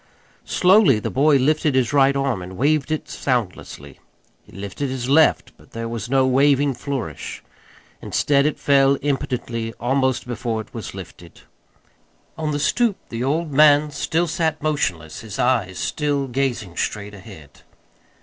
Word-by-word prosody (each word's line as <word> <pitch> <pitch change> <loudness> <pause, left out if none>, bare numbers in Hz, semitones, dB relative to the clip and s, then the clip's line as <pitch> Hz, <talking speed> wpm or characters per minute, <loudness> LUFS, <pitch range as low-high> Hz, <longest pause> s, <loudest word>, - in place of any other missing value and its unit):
Slowly 185 - +5
the - - -4
boy 140 +2 +4
lifted 150 +1 +1
his 130 -2 +1
right 140 -1 +4
arm 135 -8 -1
and 90 +1 -9
waved 145 +2 +1
it 155 - -2
soundlessly. 90 - -4 0.4
He - - -21
lifted 100 +8 -5
his 130 -2 -4
left 155 +3 +3
but - - -22
there 115 0 -4
was 115 -1 -5
no 135 0 +3
waving 140 +1 +3
flourish. 125 - -6 0.6
Instead 140 0 +1
it 150 - -2
fell 140 -1 +3
impotently 120 -5 -2
almost 130 +1 0
before 120 -2 -3
it 110 - -9
was - - -7
lifted. - - -11 0.9
On 155 -1 -3
the 145 - -1
stoop 205 +9 +1
the 115 +1 -4
old 155 +4 -1
man 150 +1 +5
still 160 +4 0
sat 160 -1 -1
motionless, 95 - -2
his 110 -3 -8
eyes 115 -8 0
still 145 -2 -1
gazing 120 -8 -2
straight 105 -1 -3
ahead. 95 - -13
135 Hz, 150 wpm, -21 LUFS, 115-145 Hz, 0.9 s, Slowly